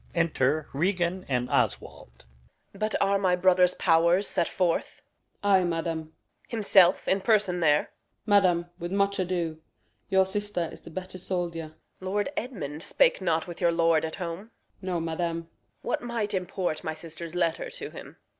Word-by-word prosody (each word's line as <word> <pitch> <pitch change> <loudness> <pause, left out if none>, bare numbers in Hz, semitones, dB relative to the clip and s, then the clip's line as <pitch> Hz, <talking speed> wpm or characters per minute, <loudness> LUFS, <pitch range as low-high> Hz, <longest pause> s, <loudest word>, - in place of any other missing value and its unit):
Enter 155 -3 +1
Regan 180 +3 0
and 125 -2 0
[Oswald - - -1
the] 60 - -32
Steward. 60 - -19 0.4
Reg. 195 - -14
But 215 0 0
are 200 0 +3
my 185 -2 +3
brother's 180 0 +4
pow'rs 170 +4 +3
set 170 - 0
forth? 180 -3 -1 0.4
Osw. - - -1
Ay, 190 -2 +5
madam. 165 -1 -1
Reg. 160 0 -12 0.4
Himself 195 -5 +4
in 195 +1 +2
person 205 -5 +2
there? 150 -3 +4
Osw. - - -14 0.4
Madam, 185 -5 +4
with 175 +1 -5
much 200 0 +1
ado. 170 -3 -2 0.5
Your 190 0 +4
sister 205 -3 -2
is - - -11
the - - -11
better 185 +2 -7
soldier. 170 -4 -4 0.2
Reg. 185 - -7
Lord 205 +6 0
Edmund 160 - -5
spake - - +2
not 165 -3 +1
with 175 -1 -9
your 170 - +4
lord 165 -1 +3
at 160 0 -3
home? 180 +4 -6 0.3
Osw. 190 - -8
No, 180 -2 0
madam. 165 +1 -2
Reg. 165 0 -8 0.4
What - - -1
might 230 -4 -2
import 180 -3 -2
my 160 0 -3
sister's 165 +1 -8
letter 170 -2 0
to - - -7
him? - - -11
175 Hz, 180 wpm, -27 LUFS, 165-195 Hz, 0.5 s, Ay